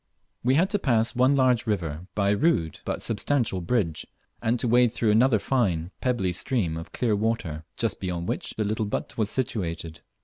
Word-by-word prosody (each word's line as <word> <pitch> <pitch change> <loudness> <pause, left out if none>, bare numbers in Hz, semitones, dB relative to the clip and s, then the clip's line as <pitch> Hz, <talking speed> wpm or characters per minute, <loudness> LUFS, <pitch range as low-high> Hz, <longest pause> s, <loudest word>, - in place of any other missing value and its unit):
We 130 +2 +3
had 180 +6 +3
to 205 - +1
pass 115 -8 +1
one 130 +3 +4
large 130 -4 +3
river, 85 -5 -2
by 100 -1 +2
a - - +3
rude 100 - +1
but - - -3
substantial 115 -3 0
bridge, 85 -5 -1 0.3
and 115 +2 +1
to 125 - +1
wade 120 0 +4
through 110 -2 +2
another 115 +2 +4
fine 95 -8 0
pebbly 115 -8 0
stream 90 -4 -1
of 80 0 -7
clear 115 -4 +1
water, 100 -8 -2
just - - -1
beyond 90 -2 -3
which - - -3
the 110 - +1
little 110 +1 -1
but - - -4
was 110 -2 0
situated. 85 -10 -3
110 Hz, 190 wpm, -26 LUFS, 90-125 Hz, 0.3 s, one